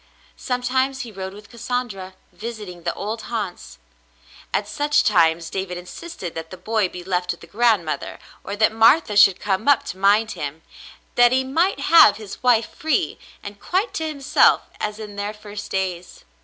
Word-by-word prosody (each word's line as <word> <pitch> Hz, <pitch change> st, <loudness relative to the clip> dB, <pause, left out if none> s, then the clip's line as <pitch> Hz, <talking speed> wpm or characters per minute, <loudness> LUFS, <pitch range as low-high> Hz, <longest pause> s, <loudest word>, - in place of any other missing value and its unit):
Sometimes 260 Hz, +2 st, -1 dB
he 240 Hz, -3 st, -7 dB
rode 190 Hz, -1 st, -7 dB
with 210 Hz, +1 st, -14 dB
Cassandra, 235 Hz, -6 st, -4 dB, 0.2 s
visiting 210 Hz, -6 st, -8 dB
the 170 Hz, 0 st, -2 dB
old 220 Hz, +3 st, -4 dB
haunts; 185 Hz, -, -5 dB, 0.7 s
at 205 Hz, -, -1 dB
such 290 Hz, +7 st, +1 dB
times 165 Hz, -4 st, +2 dB
David 190 Hz, -2 st, -4 dB
insisted 180 Hz, -, -8 dB
that 160 Hz, 0 st, -7 dB
the 185 Hz, -, -9 dB
boy 210 Hz, +1 st, 0 dB
be 180 Hz, 0 st, -9 dB
left 180 Hz, -1 st, -2 dB
with -, -, -3 dB
the -, -, -11 dB
grandmother 215 Hz, -8 st, 0 dB, 0.3 s
or 200 Hz, -, -5 dB
that 215 Hz, +1 st, +3 dB
Martha 225 Hz, +2 st, +4 dB
should 195 Hz, -2 st, +6 dB
come 200 Hz, +3 st, -2 dB
up 285 Hz, -3 st, +5 dB
to 185 Hz, -, -7 dB
mind 210 Hz, +3 st, +3 dB
him, 150 Hz, +2 st, -6 dB, 0.5 s
that 245 Hz, 0 st, +5 dB
he 260 Hz, +1 st, +2 dB
might 330 Hz, +9 st, 0 dB
have 330 Hz, -12 st, +7 dB
his 210 Hz, -3 st, -9 dB
wife 240 Hz, -3 st, +2 dB
free 315 Hz, 0 st, -1 dB, 0.2 s
and 205 Hz, 0 st, -9 dB
quite 385 Hz, +6 st, -1 dB
to 320 Hz, -, -2 dB
himself 280 Hz, -3 st, +3 dB, 0.2 s
as 210 Hz, 0 st, -3 dB
in 210 Hz, -2 st, -9 dB
their 205 Hz, +1 st, -3 dB
first 210 Hz, -1 st, -9 dB
days. 180 Hz, -2 st, -4 dB
210 Hz, 170 wpm, -22 LUFS, 185-245 Hz, 0.7 s, have